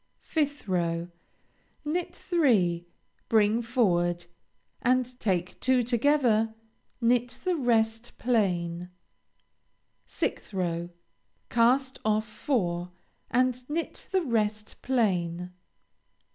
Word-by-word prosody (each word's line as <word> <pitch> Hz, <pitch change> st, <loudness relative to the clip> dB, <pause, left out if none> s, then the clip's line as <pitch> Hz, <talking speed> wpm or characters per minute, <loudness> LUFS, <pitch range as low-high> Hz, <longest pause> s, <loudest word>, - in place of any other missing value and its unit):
5th 290 Hz, -6 st, -1 dB
row 170 Hz, -2 st, 0 dB, 0.8 s
Knit 340 Hz, +4 st, -2 dB
three, 190 Hz, -, +2 dB, 0.4 s
bring 220 Hz, +1 st, +4 dB
forward, 175 Hz, -8 st, +1 dB, 0.6 s
and 255 Hz, +1 st, +3 dB
take 180 Hz, -4 st, -1 dB
two 255 Hz, -1 st, +3 dB
together, 235 Hz, -3 st, +2 dB, 0.4 s
knit 245 Hz, 0 st, +2 dB
the 365 Hz, -1 st, +1 dB
rest 230 Hz, -4 st, 0 dB
plain. 180 Hz, -7 st, 0 dB, 1.2 s
6th -, -, -3 dB
row 175 Hz, -2 st, -1 dB, 0.6 s
Cast 255 Hz, +3 st, +3 dB
off 215 Hz, 0 st, +1 dB
four, 185 Hz, -6 st, -1 dB, 0.4 s
and 250 Hz, +1 st, +1 dB
knit 330 Hz, +3 st, -3 dB
the 380 Hz, -2 st, +1 dB
rest 215 Hz, -5 st, -1 dB
plain. 180 Hz, -8 st, 0 dB
225 Hz, 90 wpm, -28 LUFS, 180-255 Hz, 1.2 s, bring